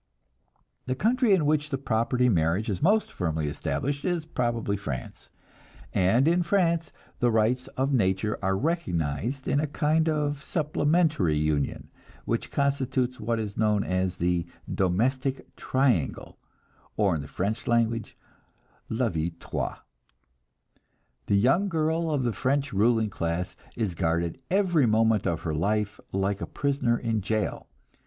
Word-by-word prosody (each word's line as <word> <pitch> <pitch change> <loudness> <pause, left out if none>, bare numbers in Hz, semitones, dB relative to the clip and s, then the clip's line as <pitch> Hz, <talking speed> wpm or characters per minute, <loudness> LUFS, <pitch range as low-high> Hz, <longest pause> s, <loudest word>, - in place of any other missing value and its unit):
The 130 - 0
country 235 - +2
in 180 -6 +4
which 150 0 +1
the 135 - -1
property 125 0 +1
marriage 90 +2 +1
is 95 - -3
most 210 +6 +3
firmly 80 -3 -2
established 140 - -2
is 175 -3 -1
probably 120 -8 -1
France; 70 -11 -6 0.6
and 115 +10 +3
in 175 +2 +3
France 170 -3 +1 0.3
the 120 - +3
rights 115 +3 +1
of 135 +2 +1
nature 105 -2 +1
are 95 0 +1
recognized 115 - -1
in 140 - +2
a 155 - 0
kind 155 +2 +1
of 145 -2 -1
supplementary 150 - +1
union, 75 -2 -1 0.3
which - - -2
constitutes 130 -2 0
what 115 +2 -1
is 105 -2 -5
known 105 -2 +2
as 95 0 -1
the 85 0 0 0.3
"domestic 130 +9 0
triangle," 130 - 0 0.6
or 100 -4 +3
in 75 - -2
the 70 - -8
French 105 - -3
language, 115 -1 0 0.7
"la 115 +2 +1
vie 80 -1 -2
trois." - - -3 1.5
The 100 - +3
young 135 - +3
girl 160 0 0
of 145 -4 0
the 120 -2 0
French 135 +2 0
ruling 110 +1 +2
classes 85 +1 -2 0.2
is 110 -6 -1
guarded 85 +6 -1
every 175 -8 +3
moment 110 -1 +3
of 85 -2 -1
her 80 - -2
life 105 +5 0
like 95 +1 -1
a - - -3
prisoner 140 -4 0
in 115 -3 -1
jail. 110 +2 -2
115 Hz, 140 wpm, -27 LUFS, 95-145 Hz, 1.5 s, in